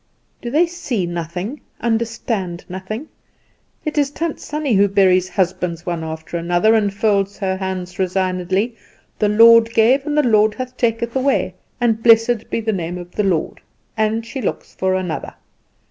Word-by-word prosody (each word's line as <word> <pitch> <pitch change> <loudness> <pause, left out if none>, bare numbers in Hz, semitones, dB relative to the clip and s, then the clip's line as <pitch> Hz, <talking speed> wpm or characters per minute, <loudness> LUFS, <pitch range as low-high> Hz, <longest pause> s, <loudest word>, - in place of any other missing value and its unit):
"Do 240 - -4
they 310 +7 +3
see 295 - -3
nothing, 175 - -5 0.2
understand 225 -6 -2
nothing? 190 - -6 0.8
It 305 -1 0
is 285 -1 +2
Tant 325 +2 -3
Sannie 295 -4 -2
who 200 0 +5
buries 185 -2 +3
husbands 180 -2 -1
one 170 -2 -3
after 160 +1 -5
another, 175 +6 +2
and 210 -3 +2
folds 200 -1 0
her 190 -2 -1
hands 185 -1 -5
resignedly, 185 +3 0 0.4
'The 210 - +2
Lord 230 +1 +7
gave, 255 +6 +4
and 295 0 -1
the 300 - +4
Lord 215 -2 +3
hath 255 0 -6
taken 235 -1 0
away, 265 -8 +1 0.3
and 225 -2 +1
blessed 225 0 +4
be - - -1
the 220 0 -1
name 175 -1 -3
of 175 0 -9
the 210 - -1
Lord,' 180 -5 -1 0.3
and 220 +1 0
she 265 +3 -6
looks 205 - -4
for 190 0 0
another. 180 -4 -4
210 Hz, 160 wpm, -19 LUFS, 185-235 Hz, 0.8 s, Lord